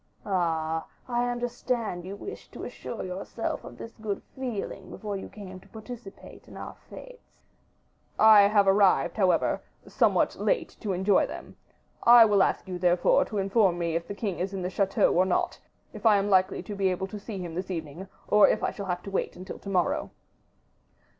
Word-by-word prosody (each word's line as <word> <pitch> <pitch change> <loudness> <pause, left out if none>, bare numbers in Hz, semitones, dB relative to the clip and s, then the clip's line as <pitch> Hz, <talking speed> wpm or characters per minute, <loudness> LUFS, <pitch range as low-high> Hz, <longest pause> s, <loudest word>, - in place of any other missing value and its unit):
"Ah! 160 -4 -1 0.2
I 245 0 0
understand 240 -6 -3
you 195 +2 -6
wished 400 - -9
to - - -8
assure - - -6
yourself 185 +1 -4
of - - -11
this 230 - -9
good 210 -2 -3
feeling 225 -7 -5
before 210 -2 -5
you 195 - -6
came 190 -3 -10
to - - -20
participate 220 -2 -11
in - - -12
our - - -7 0.2
fetes." - - -13 0.8
"I 215 -2 +8
have 205 -1 +3
arrived, 195 -2 +3
however, 190 -4 +2 0.3
somewhat - - +2
late - - -1
to 205 -4 -2
enjoy 190 +2 +3
them. - - -9 0.5
I 235 -1 +8
will 205 -2 +3
ask - - +1
you, 180 -1 -5
therefore, 175 0 +3
to 210 - -5
inform 195 -2 +2
me 170 -1 -1
if 170 0 -2
the 200 - -6
king 200 -4 -3
is 190 +2 -3
in 185 - -4
the 180 - -3
chateau 195 0 +2
or 180 - +4
not, 185 -1 -1 0.3
if - - -10
I 215 -3 +6
am 200 +1 0
likely 190 0 +2
to 210 - -7
be 195 -1 +1
able 185 +1 -2
to 205 +2 -8
see 205 0 -7
him 175 -3 -6
this 185 +3 -4
evening, 170 +1 -6 0.2
or 210 0 +6
if - - 0
I - - +1
shall 200 -2 -7
have 180 -1 -3
to 195 - -7
wait 195 - -2
until 185 +2 -8
to 200 - -8
morrow." 180 -3 0
195 Hz, 190 wpm, -27 LUFS, 180-215 Hz, 0.8 s, I